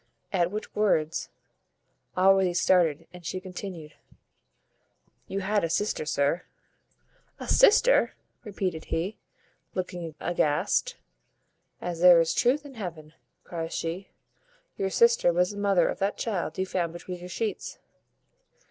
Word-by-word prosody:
At 175 -2 +2
which 210 +3 -6
words 165 -7 +1 0.9
Allworthy 190 -1 +4
started, 165 -3 +3
and 180 -1 -12
she 185 +2 -3
continued 180 -4 -8 1.3
"You 195 +1 -3
had 205 +1 +1
a 165 - 0
sister, 165 -3 -1
sir." 145 +4 +1 1.0
"A - - -7
sister!" - - +5 0.3
repeated 190 -6 -3
he, 180 +6 -3 0.6
looking 175 -4 -4
aghast. 150 -4 0 0.8
"As 175 -2 -4
there 175 -1 +8
is 165 0 +2
truth 275 +4 +2
in 280 - -10
heaven," 165 -8 -7 0.3
cries 165 -1 -5
she, 170 +4 -4 0.7
"your 195 - -1
sister 470 - +4
was 180 +2 +1
the 205 - -9
mother 200 -3 +3
of - - -3
that 195 +1 0
child 185 -8 -3
you 190 - 0
found 175 -3 -2
between 180 +1 -7
your 180 +1 -9
sheets." 215 +4 -4
180 Hz, 130 wpm, -27 LUFS, 165-200 Hz, 1.3 s, there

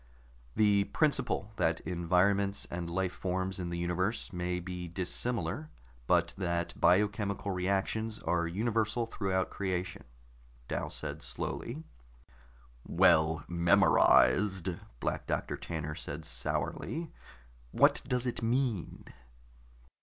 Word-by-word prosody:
"The 100 -2 +4
principle 140 -9 0
that 80 0 +1
environments 95 +3 +1
and 85 0 -4
life 95 +1 -1
forms 95 0 -2
in 90 -1 -3
the 85 - -3
universe 90 +5 -1
may 90 0 -1
be 90 0 -6
dissimilar, 115 - -2 0.4
but - - +3
that 85 -2 -1
biochemical 100 +1 +2
reactions 100 +4 -1
are 85 -4 0
universal 110 +5 0
throughout 95 -4 -1
creation," 90 -2 -3 0.6
Dal - - -2
said 75 0 -6
slowly. 130 - -5 1.0
"Well 80 0 +4
memorized," 90 +2 +4 0.3
Black - - -2
Doctor - - -1
Tanner 75 -2 -4
said 75 0 -6
sourly. 115 - -3 0.6
"What - - +4
does 125 0 0
it 125 - -2
mean?" 115 -5 -1
95 Hz, 105 wpm, -31 LUFS, 85-105 Hz, 1.0 s, The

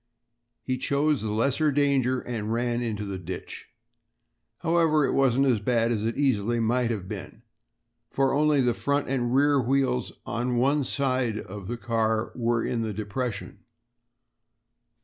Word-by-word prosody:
He 130 -1 -2
chose 140 0 +1
the 110 - -3
lesser 140 +8 +1
danger 135 -3 +2
and 110 -3 -4
ran 120 +1 0
into 105 -3 -3
the 95 -2 -5
ditch. 90 0 -7 0.9
However, 165 -3 +3
it - - 0
wasn't 135 0 +3
as 125 -5 +3
bad 115 +2 +1
as 110 -3 -1
it 115 +1 -2
easily 120 -5 +1
might 120 +1 +1
have 100 -5 -3
been, 105 +2 -8 0.7
for 135 -1 +1
only 150 0 +3
the 125 -2 +2
front 140 +4 -1
and 125 -3 -1
rear 145 0 +4
wheels 125 -1 0
of 120 +3 -2
one 140 +4 +2
side 130 -6 0
of 100 -2 -8
the 120 +2 -3
car 115 -1 0
were 120 -1 0
in 120 - -1
the 110 -2 -2
depression. 110 +1 -4
120 Hz, 150 wpm, -26 LUFS, 110-135 Hz, 0.9 s, rear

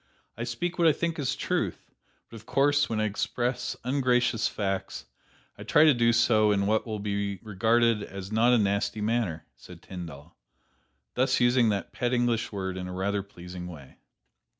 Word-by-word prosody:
"I - - -4
speak 175 0 -3
what 170 - +5
I 155 - +6
think 165 +2 -2
is 140 - -1
truth; - - -3 0.4
but - - -13
of 110 +1 -12
course, 145 +1 +2
when 110 - -1
I - - +1
express 120 +4 -2
ungracious 125 -4 +1
facts 95 -2 -3 0.5
I - - -7
try 150 - +4
to 155 -2 +6
do 120 -1 +3
so 110 -2 +4
in 100 -1 +1
what 110 +3 +1
will 110 -1 -3
be 100 -1 -2
regarded 115 +2 +2
as 100 0 -8
not 115 +3 +4
a 125 - +5
nasty 100 +1 0
manner," 105 -8 -1
said - - -14
Tyndall, 85 -4 -9 0.8
thus 130 +1 +2
using 120 -1 +4
that 100 -2 -2
pet 120 0 -1
English 120 -2 0
word 95 -2 -4
in 90 0 -5
a - - -6
rather 100 +2 -1
pleasing 90 -2 -9
way. 75 -7 -12
110 Hz, 175 wpm, -27 LUFS, 100-120 Hz, 0.8 s, I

